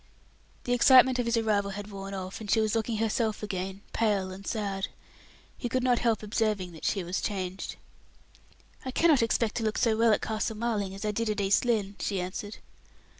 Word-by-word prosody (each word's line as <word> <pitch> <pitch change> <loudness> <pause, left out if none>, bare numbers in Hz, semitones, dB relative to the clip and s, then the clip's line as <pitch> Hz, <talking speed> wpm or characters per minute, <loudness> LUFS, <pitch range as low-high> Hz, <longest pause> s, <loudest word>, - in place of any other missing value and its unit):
The 245 - 0
excitement 255 +1 +6
of 240 - 0
his 235 0 +2
arrival 210 -3 +1
had 205 +1 -7
worn 195 0 -6
off, 185 +2 -6
and 210 - -7
she 225 - +4
was 215 -1 +1
looking 225 0 0
herself 220 0 0
again, 190 -1 -4
pale 200 -4 +1
and 195 +1 -9
sad; 200 -3 -2 0.7
he 240 - -4
could 255 +1 0
not 250 -2 +3
help 225 -3 +1
observing 210 -4 -1
that 160 - -9
she 195 - 0
was 175 +2 -2
changed. 190 -2 -3 1.1
"I 260 - -4
cannot 300 0 +4
expect 230 -1 +1
to 230 - -1
look 215 0 0
so 230 -3 +3
well 225 0 +4
at 210 - +3
Castle 220 0 -2
Marling 210 -4 -1
as 195 - -6
I 210 - +1
did 225 +1 -1
at 210 -1 -1
East 200 +4 +2
Lynne," 210 -4 0
she 195 -2 -1
answered. 185 +3 -5
215 Hz, 200 wpm, -28 LUFS, 195-230 Hz, 1.1 s, excitement